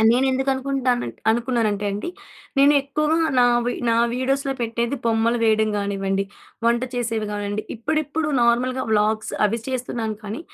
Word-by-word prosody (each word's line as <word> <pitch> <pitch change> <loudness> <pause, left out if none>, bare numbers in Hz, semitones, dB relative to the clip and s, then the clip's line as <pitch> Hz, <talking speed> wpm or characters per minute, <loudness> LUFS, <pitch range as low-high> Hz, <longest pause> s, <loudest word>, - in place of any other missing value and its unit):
ఆహ్, 220 - +5
నేనెందుకు 265 +2 +2
అనుకుంటున్నానంటే 265 -2 -1
అనుకున్నానంటే 225 -3 0
అండి 210 +13 -4 0.5
నేనెక్కువగా 285 +2 +3 0.2
నా 245 - +6 0.2
వీ 245 - +1 0.2
నా 230 - +3 0.2
వీడియోస్‌లో 270 +2 0
పెట్టేది 235 +3 -1
బొమ్మలు 230 +1 +2
వేయడం 220 -1 +3
కానివ్వండి, 195 -1 -1 0.4
వంట 235 0 +3
చేసేవి 225 -3 -1
కానివ్వండి, 205 0 -3
ఇప్పుడిప్పుడు 310 +5 -1
నార్మల్‍గా 255 +2 +2
వ్లాగ్స్ 215 0 +1
అవి 225 +3 -1
చేస్తున్నాను. 240 -4 -3
కానీ 215 +7 -5
235 Hz, 130 wpm, -22 LUFS, 220-265 Hz, 0.5 s, నా